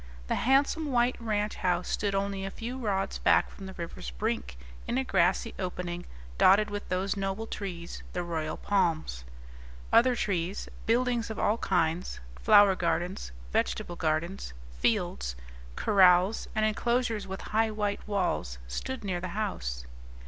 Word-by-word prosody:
The -, -, -1 dB
handsome 280 Hz, +4 st, +2 dB
white 245 Hz, 0 st, +3 dB
ranch 210 Hz, -2 st, -1 dB
house 180 Hz, -1 st, 0 dB
stood 200 Hz, -1 st, 0 dB
only 195 Hz, 0 st, -1 dB
a 195 Hz, -, -2 dB
few 230 Hz, +5 st, -6 dB
rods 195 Hz, -5 st, -1 dB
back -, -, +4 dB
from 195 Hz, -, -9 dB
the 190 Hz, -, -7 dB
river's 165 Hz, -, -6 dB
brink, -, -, -3 dB, 0.3 s
in 240 Hz, -, 0 dB
a 265 Hz, -, +2 dB
grassy 190 Hz, -1 st, +2 dB
opening 180 Hz, -2 st, -4 dB, 0.3 s
dotted 205 Hz, +3 st, +6 dB
with 205 Hz, 0 st, -5 dB
those 190 Hz, +2 st, 0 dB
noble 195 Hz, +2 st, -2 dB
trees, 180 Hz, -6 st, -6 dB
the 180 Hz, -, -1 dB
royal 160 Hz, -2 st, -3 dB
palms. 165 Hz, -, 0 dB, 0.7 s
Other 250 Hz, +1 st, +6 dB
trees, 185 Hz, -3 st, -1 dB, 0.2 s
buildings 240 Hz, 0 st, +2 dB
of 220 Hz, -, -5 dB
all 220 Hz, +3 st, +1 dB
kinds, 170 Hz, -1 st, 0 dB, 0.2 s
flower 195 Hz, -, +7 dB
gardens, 175 Hz, -, -1 dB, 0.2 s
vegetable 65 Hz, -, 0 dB
gardens, 160 Hz, -, -1 dB, 0.3 s
fields, 60 Hz, 0 st, 0 dB, 0.4 s
corrals, 185 Hz, 0 st, +4 dB
and 215 Hz, 0 st, +3 dB
enclosures 225 Hz, -1 st, 0 dB
with 190 Hz, +1 st, -5 dB
high 220 Hz, +1 st, +3 dB
white 210 Hz, -1 st, -1 dB
walls 180 Hz, -, -1 dB
stood 260 Hz, -, -4 dB
near 180 Hz, -3 st, -2 dB
the 185 Hz, -, -3 dB
house. 60 Hz, -, -3 dB
195 Hz, 145 wpm, -29 LUFS, 175-215 Hz, 0.7 s, flower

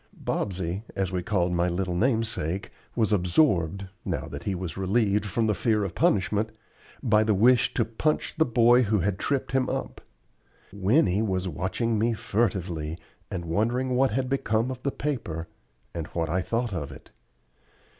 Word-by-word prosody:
Bobsey, 95 Hz, -1 st, -2 dB
as 95 Hz, -2 st, -1 dB
we 90 Hz, -1 st, -1 dB
called 90 Hz, -2 st, 0 dB
my 85 Hz, +1 st, +2 dB
little 90 Hz, +1 st, -1 dB
namesake, 110 Hz, -, 0 dB, 0.2 s
was 110 Hz, -3 st, +2 dB
absorbed 90 Hz, -, +2 dB, 0.2 s
now -, -, -3 dB
that -, -, -8 dB
he 100 Hz, -, 0 dB
was 90 Hz, -2 st, -5 dB
relieved 105 Hz, +1 st, +1 dB
from 115 Hz, +3 st, 0 dB
the 110 Hz, -, +2 dB
fear 105 Hz, +2 st, +1 dB
of 95 Hz, -4 st, -3 dB
punishment 105 Hz, +2 st, +2 dB, 0.5 s
by 110 Hz, -2 st, +4 dB
the 110 Hz, -1 st, +2 dB
wish 120 Hz, +4 st, +4 dB
to 115 Hz, -, +2 dB
"punch" 115 Hz, +7 st, -1 dB
the 160 Hz, -, +4 dB
boy 120 Hz, -1 st, +5 dB
who 105 Hz, -4 st, +2 dB
had 100 Hz, +2 st, -1 dB
tripped 140 Hz, -2 st, -1 dB
him 130 Hz, -1 st, +1 dB
up. -, -, -4 dB, 0.7 s
Winnie 100 Hz, -, +3 dB
was 95 Hz, -3 st, -1 dB
watching 100 Hz, +5 st, -1 dB
me 115 Hz, +2 st, +2 dB
furtively, 90 Hz, -8 st, -1 dB, 0.3 s
and 90 Hz, -4 st, -4 dB
wondering 115 Hz, +9 st, 0 dB
what 130 Hz, +2 st, +3 dB
had 130 Hz, +3 st, -1 dB
become 125 Hz, -2 st, 0 dB
of 130 Hz, -1 st, -7 dB
the 140 Hz, -, -1 dB
paper, 85 Hz, -, -3 dB, 0.5 s
and 85 Hz, -2 st, -4 dB
what 80 Hz, -2 st, -2 dB
I 90 Hz, +3 st, +1 dB
thought 115 Hz, +2 st, -1 dB
of 75 Hz, -5 st, -4 dB
it. -, -, -13 dB
105 Hz, 165 wpm, -26 LUFS, 90-120 Hz, 0.7 s, boy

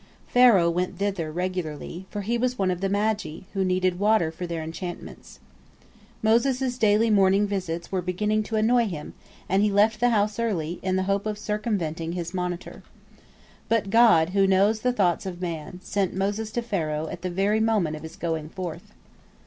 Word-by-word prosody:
Pharaoh 225 Hz, -9 st, +5 dB
went 180 Hz, +2 st, -2 dB
thither 195 Hz, -6 st, -2 dB
regularly, 180 Hz, 0 st, -4 dB
for 205 Hz, -, -4 dB
he 225 Hz, +4 st, -1 dB
was 250 Hz, +1 st, 0 dB
one 190 Hz, -2 st, +1 dB
of 180 Hz, 0 st, -4 dB
the 195 Hz, -, 0 dB
magi, 205 Hz, -5 st, -1 dB
who 195 Hz, -2 st, 0 dB
need 185 Hz, -1 st, +1 dB
water 205 Hz, -6 st, +3 dB
for 175 Hz, +2 st, -6 dB
their 165 Hz, -2 st, -4 dB
enchantments. 170 Hz, +2 st, -8 dB, 0.8 s
Moses' 250 Hz, +3 st, +2 dB
daily 215 Hz, +1 st, +3 dB
morning 195 Hz, 0 st, +4 dB
visits 180 Hz, -4 st, -4 dB
were 190 Hz, -1 st, 0 dB
beginning 210 Hz, +5 st, 0 dB
to 225 Hz, -, -4 dB
annoy 230 Hz, +2 st, +3 dB
him, 155 Hz, -6 st, -6 dB, 0.3 s
and 190 Hz, +2 st, +2 dB
he 210 Hz, -, +3 dB
left 210 Hz, +2 st, +3 dB
the 245 Hz, +1 st, +3 dB
house 210 Hz, -1 st, +1 dB
early, 175 Hz, -7 st, -2 dB
in 185 Hz, 0 st, 0 dB
the 190 Hz, -, +1 dB
hope 200 Hz, +2 st, -1 dB
of 210 Hz, -1 st, -3 dB
circumventing 195 Hz, -7 st, -2 dB
his 175 Hz, -1 st, -4 dB
monitor. 180 Hz, -1 st, -4 dB, 0.9 s
But 220 Hz, -4 st, +1 dB
God, 220 Hz, -9 st, +5 dB
who 195 Hz, 0 st, +3 dB
knows 200 Hz, +3 st, +3 dB
the 250 Hz, +3 st, +1 dB
thoughts 195 Hz, -5 st, +1 dB
of 175 Hz, -2 st, -6 dB
man, 170 Hz, 0 st, -5 dB
sent 195 Hz, -3 st, -1 dB
Moses 205 Hz, +3 st, -1 dB
to 240 Hz, -, -1 dB
Pharaoh 160 Hz, -8 st, -2 dB
at 170 Hz, +2 st, -7 dB
the 185 Hz, -, -3 dB
very 195 Hz, +4 st, +1 dB
moment 215 Hz, -8 st, +1 dB
of 155 Hz, -, -9 dB
his 160 Hz, -, -9 dB
going 160 Hz, -2 st, -3 dB
forth. 175 Hz, -2 st, -7 dB
195 Hz, 180 wpm, -25 LUFS, 175-215 Hz, 0.9 s, Pharaoh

